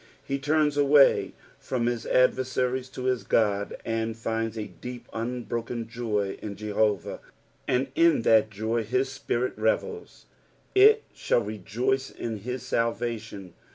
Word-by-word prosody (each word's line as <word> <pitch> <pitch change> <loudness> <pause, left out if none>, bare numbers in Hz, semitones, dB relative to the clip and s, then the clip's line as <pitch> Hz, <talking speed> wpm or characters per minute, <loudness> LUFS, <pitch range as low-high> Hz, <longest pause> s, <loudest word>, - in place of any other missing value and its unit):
lie 135 - -1
turns 150 +1 +1
away 145 0 +5 0.3
from 125 -2 -2
his 120 -1 -2
adversaries 130 0 +1
to 130 - -7
his 130 -1 +1
God, 100 -2 +1
and 115 0 -2
finds 115 0 -2
a 110 - -3
deep 125 +3 -9
unbroken 120 0 -3
joy 110 -4 -2
in 100 -2 -5
Jehovah, 105 -2 -1 0.5
and 130 +1 +2
in 165 -6 +4
that 110 -1 +5
joy 110 +2 -1
his 130 +4 0
spirit 125 -1 -2
revets. 110 - -2 0.2
" - - -36
Jt 430 +3 +7
jAoU 120 - +1
rejoice 115 +6 -2
in 115 -2 -5
hi* 125 +5 -4
talvation." 115 -5 -3
120 Hz, 135 wpm, -27 LUFS, 110-130 Hz, 0.5 s, Jt